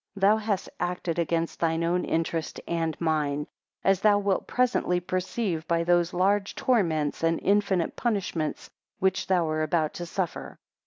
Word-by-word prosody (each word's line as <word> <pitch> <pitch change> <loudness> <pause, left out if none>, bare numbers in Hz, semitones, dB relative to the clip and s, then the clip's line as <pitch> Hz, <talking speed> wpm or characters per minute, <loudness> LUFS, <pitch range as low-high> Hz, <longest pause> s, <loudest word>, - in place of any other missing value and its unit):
11 195 0 +4
Thou 215 - +4
hast 210 -3 -2
acted 175 -1 -2
against 165 0 -1
thine 165 0 +1
own 175 +2 +1
interest 165 -1 -2
and 165 -2 -1
mine, 150 -3 0 0.4
as 195 -1 +3
thou 210 -1 +5
wilt 200 -2 0
presently 245 -8 +1
perceive 180 -1 -2
by 170 0 +1
those 175 0 +2
large 195 +3 +1
torments 165 - +1
and 165 0 +2
infinite 195 -3 +2
punishments 195 -9 -2 0.3
which 190 0 0
thou 180 -3 +2
art 155 0 -1
about 155 0 0
to 175 -3 -6
suffer. 180 0 -4
175 Hz, 155 wpm, -27 LUFS, 165-195 Hz, 0.4 s, thou